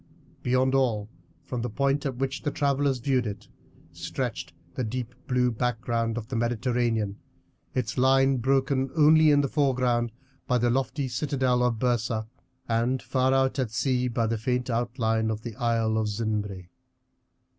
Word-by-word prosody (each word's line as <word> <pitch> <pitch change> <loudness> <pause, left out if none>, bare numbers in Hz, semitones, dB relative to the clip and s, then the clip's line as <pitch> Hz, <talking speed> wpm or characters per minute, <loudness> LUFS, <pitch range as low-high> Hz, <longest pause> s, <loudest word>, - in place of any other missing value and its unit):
Beyond 130 +1 +2
all, 115 -6 +1 0.3
from 125 -2 -3
the 120 - -2
point 140 +4 0
at 130 - -4
which 135 +3 -2
the 145 - -1
travellers 140 -2 +1
viewed 125 -1 0
it, 105 0 -7 0.4
stretched - - -4 0.2
the 130 - -2
deep 125 +1 -4
blue 125 -2 +2
background 115 -1 -1
of 110 -2 -5
the 130 - -5
Mediterranean, 115 -3 0 0.6
its 125 0 -1
line 135 +1 +4
broken 135 +1 +1
only 155 0 +6
in 145 -1 +5
the 140 - 0
foreground 125 -4 +1 0.4
by 125 - +2
the 120 0 +2
lofty 135 +2 -1
citadel 130 -2 0
of 125 -2 +1
Byrsa, 115 -2 0 0.4
and 120 +3 +1
far 130 0 +1
out 135 +1 +2
at 130 -4 0
sea 125 +2 0
by 120 -1 0
the 115 0 -1
faint 125 +2 -1
outline 115 -2 0
of 110 -1 -3
the 120 -3 -6
Isle 115 -2 +1
of 110 - 0
Zinbre. 105 -4 -3
125 Hz, 155 wpm, -27 LUFS, 115-135 Hz, 0.6 s, only